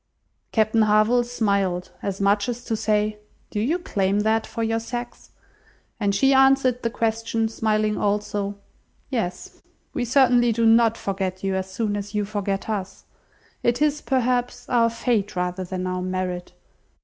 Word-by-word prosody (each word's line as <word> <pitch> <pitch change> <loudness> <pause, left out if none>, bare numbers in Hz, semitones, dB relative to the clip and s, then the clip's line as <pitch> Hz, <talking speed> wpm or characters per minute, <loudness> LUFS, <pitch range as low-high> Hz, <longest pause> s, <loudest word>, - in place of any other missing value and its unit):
Captain 220 0 +2
Harville 215 +3 +4
smiled, 200 -7 -1
as 195 -1 -3
much 200 +3 +2
as 240 0 -4
to 225 - -1
say, 210 0 0 0.3
"Do 210 - -2
you 275 +11 +1
claim 200 - 0
that 220 +1 +1
for 230 - -4
your 225 0 0
sex?" 240 +1 -7 0.7
and 200 -2 +1
she 270 +6 +4
answered 265 -2 +4
the 230 - 0
question, 225 0 -1
smiling 215 -1 0
also, 205 0 -1 0.6
"Yes. 185 -8 -4 0.3
We 245 - -1
certainly 245 -1 +4
do 230 +1 +1
not 225 0 +5
forget 190 -1 -3
you 195 0 0
as 190 0 -3
soon 210 +1 -1
as 205 +1 -5
you 210 -1 +1
forget 200 -1 -3
us. 200 -4 -4 0.6
It 240 0 +1
is, 300 0 +1
perhaps, 250 -1 0
our 235 -2 +3
fate 225 -3 -1
rather 180 +1 -2
than 185 0 -4
our 185 0 -2
merit. 180 -1 -3
215 Hz, 155 wpm, -23 LUFS, 200-235 Hz, 0.7 s, not